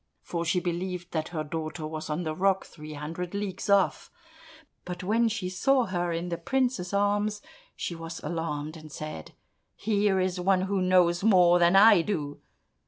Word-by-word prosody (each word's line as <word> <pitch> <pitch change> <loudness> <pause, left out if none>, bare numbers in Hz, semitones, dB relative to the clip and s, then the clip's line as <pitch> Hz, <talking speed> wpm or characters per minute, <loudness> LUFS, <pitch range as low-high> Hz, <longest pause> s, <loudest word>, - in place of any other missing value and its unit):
for 170 -1 -3
she 175 +2 +1
believed 180 0 -4
that 160 -1 -2
her 160 -3 -4
daughter 155 +1 -5
was 155 0 -6
on 155 +4 -2
the 155 -1 -2
rock 190 +3 +1
three 155 -1 -10
hundred 165 +5 -5
leagues 200 0 -4
off. 200 -1 +2 0.7
But 180 0 -6
when 225 +5 +2
she 205 -4 -3
saw 250 +8 +2
her 175 -3 -2
in 170 +1 -3
the 170 -1 -3
prince's 245 -3 -1
arms, 205 +1 +1 0.4
she - - -4
was 165 0 -7
alarmed, 155 -2 -3
and 155 -1 -11
said, 155 - -7 0.4
"Here 205 -2 +1
is 185 0 -1
one 185 +1 +2
who 190 0 -1
knows 180 -1 +3
more 180 -5 +5
than 175 +2 +4
I 205 -2 +8
do!" 150 -6 -3
180 Hz, 170 wpm, -27 LUFS, 165-195 Hz, 0.7 s, I